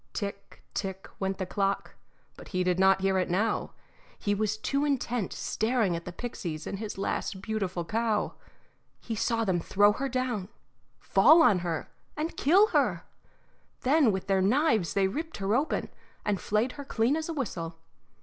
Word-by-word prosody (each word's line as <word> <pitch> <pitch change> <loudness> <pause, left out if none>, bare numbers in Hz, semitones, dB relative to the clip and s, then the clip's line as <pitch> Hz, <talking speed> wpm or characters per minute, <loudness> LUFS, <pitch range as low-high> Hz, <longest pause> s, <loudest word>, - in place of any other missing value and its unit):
Tick, 200 -1 -6
tick, 190 -1 -4
went 190 0 -1
the 185 - -2
clock, 195 +1 -1 0.4
but - - -12
he 185 -2 -1
did 180 0 +1
not 190 0 +5
hear 190 0 +2
it 185 - -1
now. 200 +6 0 0.4
He 205 - 0
was 210 +1 0
too 275 +6 0
intent 245 -7 -1
staring 220 -5 0
at 170 - -6
the 180 - -5
pixies 170 -7 -5
and 195 - -4
his 215 -2 -5
last 195 0 -2
beautiful 190 -4 -3
cow. 220 +3 0 0.7
He 230 - -5
saw 225 +1 0
them 185 -3 +1
throw 205 +4 +4
her 275 +5 -3
down, 245 -7 -2 0.5
fall 330 +1 +6
on 200 - +5
her, 170 -2 -3 0.3
and 315 +3 -2
kill 390 +9 +5
her; - - +1 0.8
then 275 -2 +4
with 190 -1 -3
their 195 -1 +2
knives 220 - +2
they 195 -1 +3
ripped 320 +11 -4
her 195 +1 0
open, 280 +6 0 0.4
and 205 -3 0
flayed 215 +4 +1
her 285 - -8
as 275 - -21
clean 235 +5 +2
as 320 +1 -3
a - - -1
whistle. 170 - -4
205 Hz, 175 wpm, -28 LUFS, 190-250 Hz, 0.8 s, fall